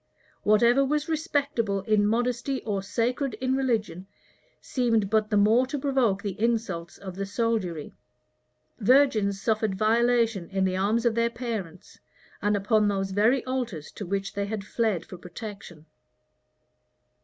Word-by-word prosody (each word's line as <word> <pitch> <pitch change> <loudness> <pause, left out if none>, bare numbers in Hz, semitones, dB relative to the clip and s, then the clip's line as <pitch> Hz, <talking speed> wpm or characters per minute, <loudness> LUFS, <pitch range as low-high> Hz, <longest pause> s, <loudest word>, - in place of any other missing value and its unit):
[*] - - -33
Whatever 235 +6 +4
was 295 +2 0
respectable 280 -10 -1
in 205 +1 +2
modesty 245 +4 -1
or 200 -3 -2
sacred 245 +6 -1
in 260 0 -1
religion, 215 -9 -1 0.5
seemed 225 -6 0
but 215 -1 +2
the 210 - +2
more 220 +5 +4
to 290 - -3
provoke 260 -8 +1
the 200 -3 -3
insults 215 -7 -1
of 190 -2 -8
the 195 +2 -4
soldiery. 200 -7 -2 0.9
Virgins 215 -4 +3
suffered 220 -2 0
violation 230 -2 +2
in 190 -1 0
the 185 0 0
arms 210 +5 +1
of 235 - +3
their 230 +1 +1
parents, 220 -8 -6 0.4
and 205 0 +2
upon 210 +1 +2
those 195 -1 -1
very 225 +6 +2
altars 240 - -4
to - - -7
which 195 +1 -2
they 200 0 -2
had 210 -1 -4
fled 215 -6 -1
for 185 - -10
protection. 180 -3 -9
215 Hz, 145 wpm, -26 LUFS, 195-240 Hz, 0.9 s, Whatever